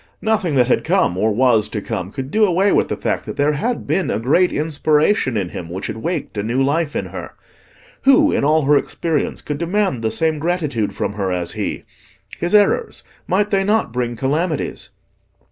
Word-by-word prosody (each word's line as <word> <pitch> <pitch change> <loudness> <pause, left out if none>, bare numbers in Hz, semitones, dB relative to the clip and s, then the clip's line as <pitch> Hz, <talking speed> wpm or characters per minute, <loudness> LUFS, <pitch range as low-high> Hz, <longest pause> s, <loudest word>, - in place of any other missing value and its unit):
Nothing 215 -8 +1
that 125 -2 +4
had 125 - +1
come, 90 - +2
or 110 +4 +1
was 115 -1 +3
to 105 - -3
come, 100 -3 -4
could 135 +3 -6
do 220 - +3
away 195 +1 +3
with - - +2
the - - -3
fact - - -2
that - - -6
there 145 +1 +3
had 230 +12 -2
been 180 -7 0
a - - 0
great 150 +11 +2
inspiration 150 - +1
in 95 -4 -2
him 85 -1 -7
which 90 +3 -5
had - - -4
waked 170 +5 -3
a 105 - -1
new 115 +5 -1
life 145 +3 0
in - - -1
her. - - -8 0.7
Who, 295 +3 +5
in - - 0
all 155 +2 +3
her 145 +2 +4
experience, 155 +1 -1
could 145 -1 -4
demand 175 - 0
the 110 - +1
same 160 +3 0
gratitude 150 - -1
from - - -3
her 100 -2 -2
as 90 -1 -2
he? - - -4 0.6
His 175 +4 +1
errors—might 205 - 0
they 195 -1 +2
not 210 - +1
bring 120 -1 -2
calamities? 150 +6 -2
150 Hz, 195 wpm, -19 LUFS, 115-180 Hz, 0.7 s, Who